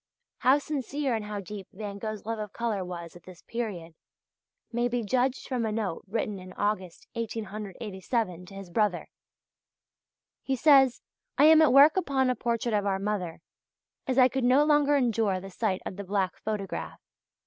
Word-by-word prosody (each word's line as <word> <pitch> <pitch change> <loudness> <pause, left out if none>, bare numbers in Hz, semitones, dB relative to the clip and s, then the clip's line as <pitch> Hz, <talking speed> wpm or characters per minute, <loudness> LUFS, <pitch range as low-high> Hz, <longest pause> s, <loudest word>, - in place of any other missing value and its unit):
How 260 +3 +5
sincere 285 -2 -2
and 220 -2 -2
how 210 -1 -4
deep 195 0 -8
Van 200 0 -7
Gogh's 215 -1 -5
love 225 0 -3
of 210 -2 -6
colour 225 -5 -1
was 170 -2 -7
at 175 - -12
this 180 -1 -14
period 200 -9 -5 0.8
may 240 0 +1
be 245 -1 -1
judged 255 +4 0
from 250 -3 -1
a 220 - -1
note 210 -6 -3
written 210 -1 -2
in 185 0 -11
August 190 -4 -2
1887 210 -3 -4
to 195 - -12
his 195 -3 -9
brother. 205 -2 0 1.3
He 270 - -1
says: 270 -2 +5 0.3
"I 280 - +5
am 315 +1 +8
at 310 - +5
work 285 +6 +7
upon 265 -7 +2
a - - -1
portrait 235 0 -1
of 205 -1 +1
our 195 -1 +1
mother; 195 -4 -3 0.7
as 260 -1 0
I 255 -1 +8
could 265 0 -2
no 255 +4 +5
longer 295 -1 +4
endure 225 -7 +1
the 195 +1 -9
sight 190 -1 -1
of 185 - -6
the 200 - -5
black 195 -1 -1
photograph. 210 -3 -4
215 Hz, 175 wpm, -28 LUFS, 195-255 Hz, 1.3 s, am